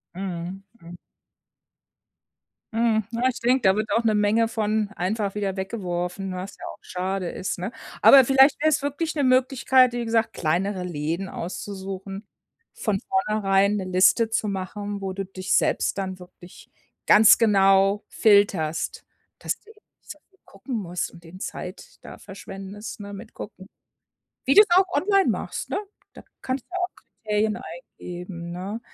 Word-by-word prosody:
Mhm, 185 Hz, 0 st, -5 dB, 0.2 s
mhm. 170 Hz, +1 st, -11 dB, 1.8 s
Mhm, 225 Hz, -1 st, +2 dB
na, 240 Hz, +2 st, +1 dB
ich 255 Hz, -, -5 dB
denke, 250 Hz, +2 st, +2 dB
da 190 Hz, -, +5 dB
wird 215 Hz, 0 st, -2 dB
auch 230 Hz, +3 st, +1 dB
'ne 215 Hz, -1 st, +3 dB
Menge 210 Hz, +2 st, +3 dB
von 215 Hz, -2 st, -1 dB
einfach 200 Hz, +2 st, -2 dB
wieder 200 Hz, -2 st, -2 dB
weggeworfen, 190 Hz, -1 st, -3 dB
was 185 Hz, +2 st, -6 dB
ja -, -, -13 dB
auch -, -, -8 dB
schade 185 Hz, 0 st, -3 dB
ist, 185 Hz, -, -4 dB
ne? 185 Hz, +5 st, -4 dB, 0.3 s
Aber 275 Hz, -1 st, +9 dB
vielleicht 270 Hz, +3 st, +5 dB
wäre 310 Hz, -, +4 dB
es 310 Hz, -1 st, +1 dB
wirklich 290 Hz, +3 st, -2 dB
'ne 285 Hz, -3 st, +1 dB
Möglichkeit, 255 Hz, 0 st, +4 dB
wie 240 Hz, 0 st, -3 dB
gesagt, 225 Hz, 0 st, +1 dB
kleinere 185 Hz, +4 st, -1 dB
Läden 165 Hz, +3 st, -3 dB
auszusuchen. 195 Hz, +2 st, -6 dB, 0.5 s
Von 205 Hz, -3 st, -1 dB
vornherein 200 Hz, 0 st, +1 dB
'ne 200 Hz, -, -2 dB
Liste 185 Hz, +5 st, +3 dB
zu 220 Hz, -1 st, -1 dB
machen, 200 Hz, +1 st, -4 dB
wo 190 Hz, -1 st, -3 dB
du 195 Hz, +1 st, -4 dB
dich 185 Hz, 0 st, -4 dB
selbst -, -, 0 dB
dann 190 Hz, -1 st, -3 dB
wirklich 180 Hz, 0 st, -15 dB, 0.4 s
ganz 215 Hz, 0 st, +8 dB
genau 195 Hz, -1 st, +4 dB
filterst. 200 Hz, -7 st, +2 dB, 0.3 s
Dass -, -, -3 dB
du 430 Hz, -, -23 dB
eben 430 Hz, -, -22 dB, 0.2 s
nicht -, -, -27 dB
so 305 Hz, -, -11 dB
viel 385 Hz, -1 st, -32 dB
gucken 230 Hz, +5 st, -6 dB
musst 180 Hz, -4 st, -3 dB
und 170 Hz, 0 st, -16 dB
den 180 Hz, +3 st, -12 dB
Zeit 180 Hz, +1 st, -7 dB
da -, -, -11 dB
verschwendest, 195 Hz, +2 st, -9 dB
ne, 200 Hz, 0 st, -8 dB
mit 210 Hz, +3 st, -10 dB
Gucken. 190 Hz, -2 st, -10 dB, 0.8 s
Wie 275 Hz, -, +3 dB
du 420 Hz, -, +10 dB
es 415 Hz, -, -6 dB
auch 375 Hz, 0 st, +5 dB
online 390 Hz, +6 st, +3 dB
machst, -, -, -4 dB
ne? -, -, -1 dB, 0.3 s
Da -, -, -13 dB, 0.2 s
kannst 260 Hz, 0 st, -2 dB
du -, -, -44 dB
ja -, -, -3 dB
auch 360 Hz, +1 st, -2 dB, 0.3 s
Kriterien 215 Hz, 0 st, +1 dB
eingeben, 175 Hz, -1 st, -9 dB
ne? 190 Hz, +5 st, -5 dB
200 Hz, 165 wpm, -24 LUFS, 185-230 Hz, 1.8 s, du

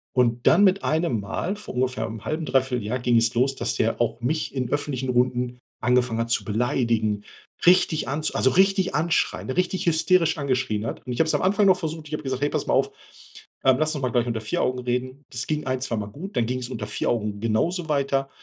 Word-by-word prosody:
Und 120 Hz, -1 st, +2 dB
dann 200 Hz, -, +6 dB
mit 195 Hz, 0 st, +3 dB
einem 155 Hz, -7 st, +1 dB
Mal 165 Hz, -, -3 dB
vor 210 Hz, -, -9 dB
ungefähr 125 Hz, 0 st, -1 dB
'nem 110 Hz, -1 st, -8 dB
0,5, 155 Hz, +6 st, -2 dB
3/4 130 Hz, -5 st, 0 dB
Jahr 125 Hz, +4 st, -2 dB
ging 120 Hz, -1 st, +2 dB
es 115 Hz, 0 st, +2 dB
los, 130 Hz, +3 st, +1 dB
dass -, -, -2 dB
der 115 Hz, +1 st, 0 dB
auch 115 Hz, 0 st, -1 dB
mich 150 Hz, +5 st, -1 dB
in 125 Hz, -3 st, -2 dB
öffentlichen 135 Hz, -3 st, -2 dB
Runden 125 Hz, 0 st, +1 dB, 0.2 s
angefangen 125 Hz, -1 st, +2 dB
hat 115 Hz, 0 st, -1 dB
zu 120 Hz, -, +1 dB
beleidigen. 110 Hz, -2 st, 0 dB, 0.4 s
Richtig 175 Hz, -3 st, +4 dB
anzu 150 Hz, +2 st, -2 dB
also, 130 Hz, -, +3 dB
richtig 190 Hz, 0 st, +3 dB
anschreien, 160 Hz, -3 st, 0 dB
richtig 185 Hz, +5 st, -1 dB
hysterisch 170 Hz, 0 st, +3 dB
angeschrien 125 Hz, -6 st, -1 dB
hat. 115 Hz, -, -6 dB
Und 125 Hz, -, -3 dB
ich -, -, -5 dB
habe 160 Hz, -, +3 dB
es -, -, +1 dB
am -, -, 0 dB
Anfang 200 Hz, +2 st, +3 dB
noch 185 Hz, -1 st, +5 dB
versucht, 160 Hz, -2 st, -5 dB
ich 150 Hz, -, -10 dB
habe 150 Hz, -, -3 dB
gesagt: 130 Hz, -1 st, -3 dB
„Hey, 145 Hz, -, +2 dB
pass -, -, -2 dB
mal -, -, +1 dB
auf. -, -, +3 dB, 0.7 s
Äh, 130 Hz, -, +6 dB
lass 155 Hz, 0 st, 0 dB
uns 145 Hz, -, -4 dB
mal 125 Hz, -, 0 dB
gleich 120 Hz, 0 st, +1 dB
unter 115 Hz, -2 st, -2 dB
4 110 Hz, -, -2 dB
Augen 125 Hz, 0 st, 0 dB
reden.” 125 Hz, +2 st, -3 dB
Das 120 Hz, 0 st, -4 dB
ging 150 Hz, -2 st, -2 dB
ein, 130 Hz, 0 st, -1 dB
zweimal 105 Hz, -5 st, -3 dB
gut. 170 Hz, -, -9 dB
Dann 120 Hz, -, +2 dB
ging 125 Hz, +2 st, -2 dB
es 125 Hz, -, -6 dB
unter 110 Hz, -5 st, -5 dB
4 105 Hz, -, -2 dB
Augen 105 Hz, -3 st, -1 dB
genauso 155 Hz, -, 0 dB
weiter. 140 Hz, -2 st, 0 dB
130 Hz, 230 wpm, -24 LUFS, 120-155 Hz, 0.7 s, dann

